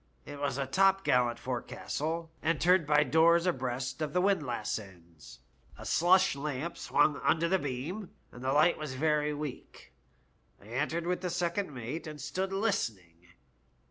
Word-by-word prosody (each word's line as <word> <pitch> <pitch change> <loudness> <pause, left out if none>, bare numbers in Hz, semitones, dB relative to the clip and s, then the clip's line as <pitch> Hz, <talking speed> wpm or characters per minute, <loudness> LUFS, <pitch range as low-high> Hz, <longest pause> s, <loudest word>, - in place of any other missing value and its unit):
It 145 - -8
was 140 -2 -1
a 140 - -1
topgallant 135 -8 +3
forecastle, 155 +6 -4
entered 170 +1 +3
by 150 0 +5
doors 165 +5 +4
abreast 130 -3 -2
of 150 -1 -2
the 180 - +2
windlass 150 - 0
ends; 85 - -15 0.4
a - - -10
slush 185 0 +4
lamp 145 +3 -4
swung 150 - +2
under 170 +1 +1
the 190 +2 +2
beam, 150 +9 -4 0.2
and 120 - -11
the 130 - 0
light 155 +5 +4
was 150 -4 -5
very 150 +1 +1
weak 145 -2 -7 0.7
I 100 - -16
entered 150 +7 -1
with 180 +1 -1
the 180 - -2
second 175 +1 -1
mate, 130 +6 -6
and 150 -1 -8
stood 190 +7 -3
listening. 105 - -2
150 Hz, 150 wpm, -30 LUFS, 130-170 Hz, 0.7 s, by